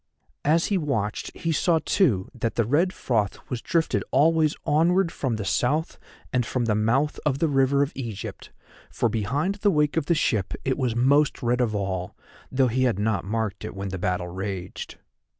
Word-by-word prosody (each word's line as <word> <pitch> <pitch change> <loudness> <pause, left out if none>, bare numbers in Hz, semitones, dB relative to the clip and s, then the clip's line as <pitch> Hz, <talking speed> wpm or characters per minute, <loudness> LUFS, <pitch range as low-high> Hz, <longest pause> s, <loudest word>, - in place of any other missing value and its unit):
As 160 +3 +3
he 200 -3 +1
watched 110 -10 -2
he 165 - -1
saw, 165 +1 +2
too, 110 - +2
that 115 -2 -3
the 115 - +2
red 160 - +2
froth 110 - -1
was 125 -2 -2
drifted 165 -1 0
always 155 +2 +3
onward 170 +4 +3
from 130 -5 -2
the 105 -2 -4
South 150 - 0 0.3
and 125 -1 +2
from 120 +1 -1
the 110 - +2
mouth 120 +8 +1
of 145 -4 +1
the 165 - +1
River 140 0 +3
of 140 - -3
Egypt, 115 -7 -6 0.4
for 120 - 0
behind 135 - -1
the 205 - +4
wake 150 -3 +1
of 155 -3 0
the 170 - +3
ship 110 - 0
it 130 - +1
was 125 -4 0
most 140 +5 +3
red 120 +1 +1
of 110 -3 0
all, 95 -2 -3 0.4
though 130 0 +3
he 130 +2 +1
had 120 -6 +1
not 105 -3 0
marked 105 -1 -2
it 110 - -6
when 100 0 -4
the 95 0 -5
battle 90 -1 -1
raged. 95 0 -5
125 Hz, 190 wpm, -25 LUFS, 105-150 Hz, 0.4 s, the